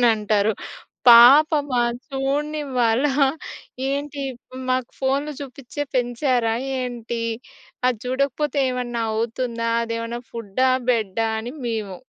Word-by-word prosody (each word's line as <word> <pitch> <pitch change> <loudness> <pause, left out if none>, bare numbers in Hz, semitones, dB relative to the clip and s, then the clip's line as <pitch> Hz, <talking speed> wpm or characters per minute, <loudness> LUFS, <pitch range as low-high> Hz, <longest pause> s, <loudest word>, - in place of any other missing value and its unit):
అనంటారు. 215 -2 +3 0.6
"పాపమా? 275 +2 +7 0.3
చూడనివ్వాలా? 275 -2 0 0.8
ఏంటి 280 0 -3 0.5
మాకు 255 -1 0
ఫోన్‌లు 275 +3 0
చూపించే 275 +1 -6
పెంచారా 245 -1 +1 0.3
ఏంటి? 235 -2 -4 0.7
అది 245 -3 -1
చూడకపోతే 275 +3 -1
ఏమన్నా 240 -2 -3
అవుతుందా? 230 +1 -2 0.2
అదేమన్నా 230 +1 -4
ఫుడ్డా! 230 +3 0 0.2
బెడ్డా!" 225 -1 0
అని 240 +3 -6
మేము 215 -5 -3
245 Hz, 90 wpm, -22 LUFS, 230-275 Hz, 0.8 s, పాపమా